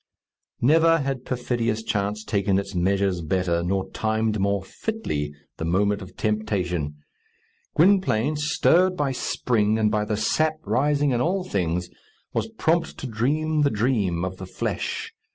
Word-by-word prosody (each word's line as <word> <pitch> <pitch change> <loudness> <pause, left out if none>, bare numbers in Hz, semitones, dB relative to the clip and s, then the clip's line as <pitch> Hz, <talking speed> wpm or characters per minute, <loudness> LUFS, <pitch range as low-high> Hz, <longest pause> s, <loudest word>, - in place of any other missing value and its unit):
Never 165 +5 +5
had 135 -4 -3
perfidious 120 -3 -1
chance 105 0 -1
taken 100 -3 +1
its 100 - -3
measures 95 0 +1
better, 85 +1 0
nor 95 +2 -1
timed 110 -1 0
more 100 0 +1
fitly 95 - -3 0.3
the 80 - -3
moment 100 +4 +1
of 95 -1 -11
temptation. 95 -8 -1 0.8
Gwynplaine, 155 - +3
stirred 170 +5 +3
by 145 -4 0
spring, 110 -4 0
and 110 -1 +2
by 105 -1 +1
the 105 0 -1
sap 155 +7 +1
rising 140 +6 +2
in 120 -1 +1
all 185 +5 +1
things, 90 - -1 0.5
was - - 0
prompt 170 -6 0
to - - -6
dream 150 +7 0
the 145 - +4
dream 105 -7 0
of 95 0 -5
the 95 - -8
flesh. - - -3
110 Hz, 145 wpm, -24 LUFS, 95-145 Hz, 0.8 s, Never